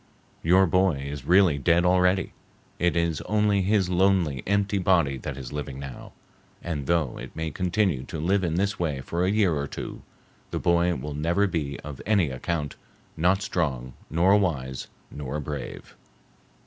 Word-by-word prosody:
Your 95 Hz, +4 st, +5 dB
boy 90 Hz, -1 st, +3 dB
is 70 Hz, -1 st, -6 dB
really 90 Hz, -3 st, +4 dB
dead 85 Hz, +4 st, +3 dB
already; 90 Hz, +1 st, +2 dB, 0.5 s
it 85 Hz, 0 st, +2 dB
is 85 Hz, -2 st, 0 dB
only 105 Hz, -2 st, +2 dB
his 100 Hz, 0 st, +2 dB
lonely, 90 Hz, -6 st, +2 dB
empty 100 Hz, 0 st, +1 dB
body 85 Hz, -7 st, +2 dB
that 70 Hz, +2 st, -6 dB
is 65 Hz, -1 st, -7 dB
living 70 Hz, -2 st, -5 dB
now, 70 Hz, -2 st, -9 dB, 0.5 s
and 75 Hz, -6 st, -4 dB
though 80 Hz, -7 st, 0 dB
it -, -, -9 dB
may 80 Hz, 0 st, -3 dB
continue 90 Hz, -2 st, 0 dB
to 80 Hz, -, -6 dB
live 95 Hz, +5 st, +1 dB
in 85 Hz, -2 st, 0 dB
this 100 Hz, +3 st, 0 dB
way 75 Hz, -6 st, -1 dB
for 85 Hz, +6 st, -2 dB
a 90 Hz, -, +2 dB
year 100 Hz, -4 st, +3 dB
or 70 Hz, -1 st, -2 dB
two, -, -, -7 dB, 0.5 s
the -, -, -3 dB
boy 85 Hz, 0 st, +2 dB
will 75 Hz, +3 st, -5 dB
never 85 Hz, +7 st, +1 dB
be 75 Hz, -7 st, -3 dB
of 75 Hz, -2 st, -8 dB
any 100 Hz, -9 st, +3 dB
account, 75 Hz, +2 st, -3 dB, 0.4 s
not 90 Hz, +5 st, +2 dB
strong, 65 Hz, -10 st, -2 dB, 0.2 s
nor 90 Hz, +5 st, +4 dB
wise, 65 Hz, -10 st, -2 dB, 0.2 s
nor 75 Hz, 0 st, -4 dB
brave." 75 Hz, -2 st, -7 dB
85 Hz, 165 wpm, -26 LUFS, 70-95 Hz, 0.5 s, Your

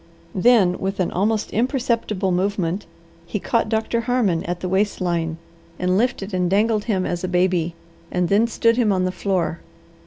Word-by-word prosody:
Then, 195 Hz, -3 st, +4 dB
with 195 Hz, +1 st, -3 dB
an 180 Hz, -, 0 dB
almost 210 Hz, +3 st, 0 dB
imperceptible 230 Hz, -5 st, 0 dB
movement, 185 Hz, 0 st, -1 dB, 0.4 s
he 210 Hz, -, -3 dB
caught 230 Hz, +2 st, 0 dB
Doctor 225 Hz, +1 st, 0 dB
Harmon 230 Hz, -9 st, +1 dB
at 175 Hz, 0 st, -3 dB
the 185 Hz, -, -3 dB
waist 195 Hz, +3 st, 0 dB
line, 170 Hz, -3 st, -1 dB, 0.4 s
and 180 Hz, 0 st, +1 dB
lifted 210 Hz, -2 st, 0 dB
and 180 Hz, -1 st, +1 dB
dangled 210 Hz, +2 st, +2 dB
him 195 Hz, -5 st, 0 dB
as 175 Hz, 0 st, -3 dB
a -, -, 0 dB
baby, 180 Hz, -2 st, +1 dB, 0.3 s
and 180 Hz, -1 st, 0 dB
then 205 Hz, +5 st, +3 dB
stood 230 Hz, 0 st, +2 dB
him 230 Hz, -4 st, +3 dB
on 185 Hz, -1 st, +1 dB
the 185 Hz, -, 0 dB
floor. 185 Hz, -3 st, -1 dB
195 Hz, 175 wpm, -22 LUFS, 180-220 Hz, 0.4 s, Then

